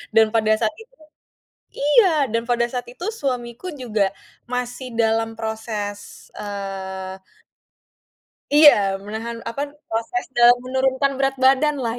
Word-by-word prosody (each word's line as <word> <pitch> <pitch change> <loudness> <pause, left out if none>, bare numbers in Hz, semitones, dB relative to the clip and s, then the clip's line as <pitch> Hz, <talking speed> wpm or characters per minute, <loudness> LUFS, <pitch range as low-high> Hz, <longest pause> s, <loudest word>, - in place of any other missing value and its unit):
Dan 220 -1 +5
pada 220 -1 +3
saat 220 -2 0
itu 460 +2 -16 0.9
iya, 305 0 +4
dan 230 0 +1
pada 240 -1 +2
saat 250 -1 -3
itu 250 +8 -9 0.2
suamiku 250 +3 -3
juga 215 -5 +1 0.4
masih 250 +1 -4
dalam 225 0 +1
proses, 220 -2 -5
eee 190 -2 -6 1.3
Iya, 285 -11 +7
menahan, 225 +3 -6
apa, 230 +5 -4 0.3
proses 230 +2 -2
dalam 240 -1 +6
menurunkan 265 +1 0
berat 270 0 +1
badan 270 +2 +3
lah 230 0 -2
235 Hz, 120 wpm, -22 LUFS, 220-265 Hz, 1.3 s, Iya